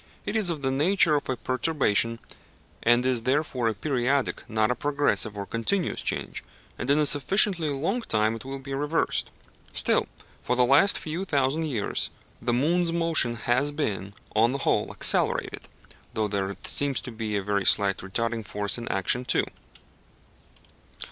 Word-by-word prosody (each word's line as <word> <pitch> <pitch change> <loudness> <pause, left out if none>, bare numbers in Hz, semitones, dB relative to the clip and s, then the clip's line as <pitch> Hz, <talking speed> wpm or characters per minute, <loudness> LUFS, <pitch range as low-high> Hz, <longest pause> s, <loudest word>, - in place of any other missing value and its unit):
It - - -3
is 215 -5 +2
of 155 -4 -4
the 135 - +1
nature 160 +4 +3
of 145 -2 -1
a 130 - -1
perturbation, 130 -4 0 0.6
and 120 +2 +3
is 130 -3 +2
therefore 130 -1 0
a 110 - -1
periodic 135 +3 -1
not 110 0 +1
a - - 0
progressive 140 -7 0
or 100 - -4
continuous 140 - -2
change, - - -3 0.4
and 125 - -4
in 140 - +4
a 150 - +3
sufficiently 165 +4 +4
long 165 - -1
time 110 - +1
it 115 - -9
will 135 +1 -6
be 135 0 -8
reversed. 150 +4 -1 0.4
Still, - - +2 0.3
for 125 - -1
the 125 0 +3
last 145 +11 +4
few 165 +4 -4
thousand 145 -2 0
years 120 -9 -2 0.3
the 120 - 0
moon's 165 +8 +1
motion 165 -8 +4
has 120 +5 +1
been, 100 -9 -4 0.2
on 115 +3 +3
the - - -1
whole, - - +1
accelerated - - 0 0.5
(though 110 -1 0
there 100 -1 -3
seems 140 -2 -1
to 125 - -8
be 110 -2 -3
a 100 - -3
very 100 0 -1
slight 100 0 +2
retarding 115 +4 -3
force 105 +2 -1
in 120 - -7
action 95 +6 +1
too). - - +1
130 Hz, 165 wpm, -26 LUFS, 110-150 Hz, 0.6 s, in